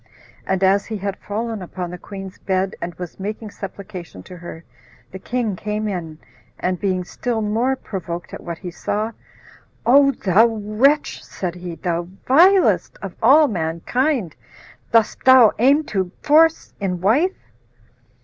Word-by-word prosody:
And 190 0 0
as 195 +1 +3
he 220 - -4
had 200 0 -3
fallen 220 +1 -4
upon 180 -1 -6
the 180 - -6
queen's 195 -1 -9
bed, 190 0 -1
and 170 0 -5
was 180 +1 -8
making 210 +2 -5
supplication 190 - -9
to 180 - -11
her, 170 -1 -9 0.5
the 190 - -8
king 235 -2 -2
came 210 +3 -3
in, 170 -6 -5 0.4
and 180 -1 -1
being 185 -2 0
still 235 +5 -3
more 225 +5 0
provoked 175 -7 -6
at - - -7
what 170 -1 -6
he 180 0 -7
saw, 210 +6 -2 0.7
"O 275 +3 +6
thou 215 -3 +3
wretch," 225 +7 +1
said 180 -3 -5
he, 175 -1 -7
"thou 170 +1 -2 0.2
vilest 360 +8 +4
of 195 -3 -5 0.4
mankind, 180 - -1 0.6
dost 225 -2 +2
thou 260 -4 +8
aim 280 +6 +4
to 190 -9 -2
force 320 +2 +4
in 185 -3 -2
wife?" 270 - +2
200 Hz, 145 wpm, -21 LUFS, 180-235 Hz, 0.7 s, thou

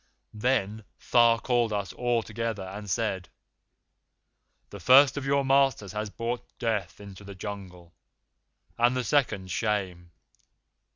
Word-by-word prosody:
"Then 110 -2 -1 0.3
Tha 115 -1 +5
called 120 -3 +1
us 100 -2 -3
all 120 -2 0
together 110 -2 -4
and 100 +2 -8
said: 95 -3 -2 1.4
'The 100 - -9
first 130 +7 +6
of 140 -2 -4
your 140 0 +2
masters 135 -7 +2
has 105 +1 -4
brought 120 +3 -5
Death 105 -6 -2
into 100 -1 -11
the 100 -1 -10
Jungle, 95 -4 -8 0.9
and 120 +2 +3
the 125 - -1
second 110 -7 0
Shame. 95 -5 -2
110 Hz, 125 wpm, -27 LUFS, 100-120 Hz, 1.4 s, first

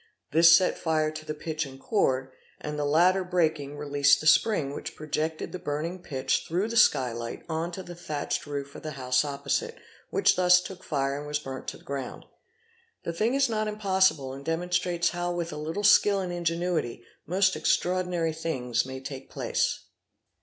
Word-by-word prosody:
This 165 +1 +7
set 185 - 0
fire 155 -2 +1
to 155 0 -8
the 155 - -3
pitch 155 0 -3
and 135 -2 -10
cord, 130 - 0 0.3
and 150 0 -5
the 145 - 0
latter 180 +6 +4
breaking 155 -5 0
released 145 -1 +3
the - - -7
spring, 155 -3 +3
which - - -6
projected 155 +1 -3
the 185 - -6
burning 165 +5 -3
pitch 135 -6 -1
through 185 +7 -1
the 230 - -4
sky 130 - +4
light 115 0 -6
on 165 +1 -2
to 190 - -6
the 175 - -9
thatched 155 -4 -4
roof 140 -1 -5
of - - -10
the 155 -1 -6
house 125 -1 +1
opposite, 150 - -2 0.3
which 405 - +3
thus 180 0 +6
took 185 0 -9
fire 140 -2 -1
and 145 - -7
was 150 0 0
burnt 135 -3 -7
to - - -5
the - - -21
ground. 135 -2 -6 0.8
The 170 - -3
thing 220 +9 +1
is 275 -1 +3
not 215 -2 -1
impossible 190 -10 +1
and 135 +1 -9
demonstrates 175 +2 0
how, 175 0 -2
with 170 -2 -3
a - - -6
little 160 +7 -4
skill 205 0 +5
and 180 -2 -3
ingenuity, 170 -7 -1 0.2
most 190 +3 +2
extraordinary 180 -3 0
things 125 -7 -1
may 130 0 -7
take 135 0 -8
place. - - -1
160 Hz, 185 wpm, -27 LUFS, 140-180 Hz, 0.8 s, This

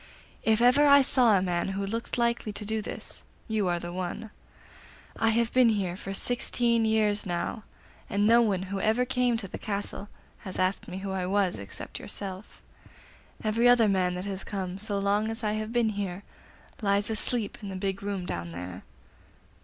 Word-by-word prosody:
If 220 0 +2
ever 280 +4 +6
I 280 -1 +8
saw 240 -5 +4
a 185 - +1
man 175 -2 0
who 200 - -1
looked 230 +5 -3
likely 235 -2 0
to 210 - -6
do 220 +1 -1
this, - - -7 0.3
you 215 -4 0
are 175 -1 +1
the 175 0 -6
one. 185 +4 -5 0.8
I 225 - +2
have 230 +1 +1
been 255 -2 +6
here 195 -5 0
for 195 +1 -7
sixteen 235 +2 +1
years 215 -2 +2
now, 195 +3 -3 0.4
and 205 +1 +1
no 230 +2 +6
one 200 -5 +1
who 195 - -1
ever 225 +5 +2
came 250 -2 +1
to 210 -3 -6
the - - -7
castle 205 0 -3 0.3
has 190 -4 -7
asked 185 +1 0
me 180 - -6
who 195 0 -4
I 185 -1 -2
was, 195 - +1
except 100 -1 -8
yourself. 195 0 -5 0.8
Every 230 +3 +3
other 240 -3 +6
man 185 -2 +1
that 180 +1 -5
has 195 -1 -4
come, 190 -2 -4
so 205 0 0
long 200 +2 +1
as 225 +1 -5
I 210 - +1
have 215 +1 -3
been 235 -2 +2
here, 200 -2 -4 0.6
lies 205 +1 +1
asleep 220 -1 0
in 200 - -6
the 190 - -5
big 195 +1 -2
room 200 -2 -3
down 85 - -4
there. 90 +2 -7
205 Hz, 190 wpm, -28 LUFS, 190-225 Hz, 0.8 s, I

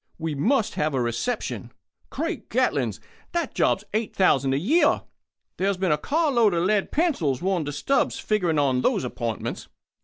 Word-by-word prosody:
We 160 -1 -3
must 220 - +1
have 150 -1 -1
a - - +1
reception. 120 - -2 0.4
Great - - -4
Gatlings! - - 0 0.3
that 340 -3 -1
job's 195 - +1
eight 220 0 -2
thousand 135 -8 +3
a - - +1
year! 275 - +3 0.5
There's 195 0 0
been 185 -2 0
a 150 - +3
car 310 - +1
load 225 -7 +3
of 170 - +1
lead 200 +1 +1
pencils 225 - +1
worn 185 -3 0
to 145 - -3
stubs 265 - 0
figuring 180 -7 0
on 135 -3 +2
those - - +1
appointments. 120 -2 -4
185 Hz, 165 wpm, -25 LUFS, 145-230 Hz, 0.5 s, thousand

